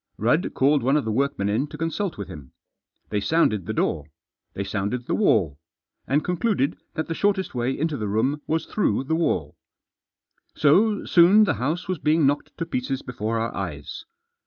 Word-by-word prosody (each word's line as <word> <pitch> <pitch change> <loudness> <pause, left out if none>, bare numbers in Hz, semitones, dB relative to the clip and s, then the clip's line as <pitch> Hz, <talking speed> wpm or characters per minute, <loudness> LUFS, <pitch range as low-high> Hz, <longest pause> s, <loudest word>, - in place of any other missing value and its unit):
Rudd 150 - +1
called 140 +2 +3
one 135 +5 +2
of 145 - -1
the 110 - -1
workmen 135 -3 0
in 110 +8 0
to - - -10
consult 165 +3 -2
with 100 - -6
him. 70 -4 -11 0.6
They 105 - 0
sounded 110 - +1
the - - -1
door, 75 -8 -1 0.5
they 100 - -2
sounded 105 +5 -3
the - - -2
wall, 95 - +2 0.5
and 145 +3 +1
concluded 180 - 0 0.2
that 160 - -2
the 165 - -3
shortest 195 +1 0
way 125 +1 -1
into 155 -1 -1
the 105 - -3
room 125 +9 0
was 160 0 0
through 210 -9 0
the 160 +4 -1
wall. 90 - -1 1.0
So 200 +8 +3
soon 185 +5 +6
the 185 -8 +2
house 155 +7 -1
was 185 -4 -2
being 155 +1 +2
knocked 145 +1 -1
to 165 - -2
pieces 135 -1 -3
before 115 -2 -3
our 115 +1 -2
eyes. 80 -8 -6
140 Hz, 185 wpm, -24 LUFS, 110-165 Hz, 1.0 s, soon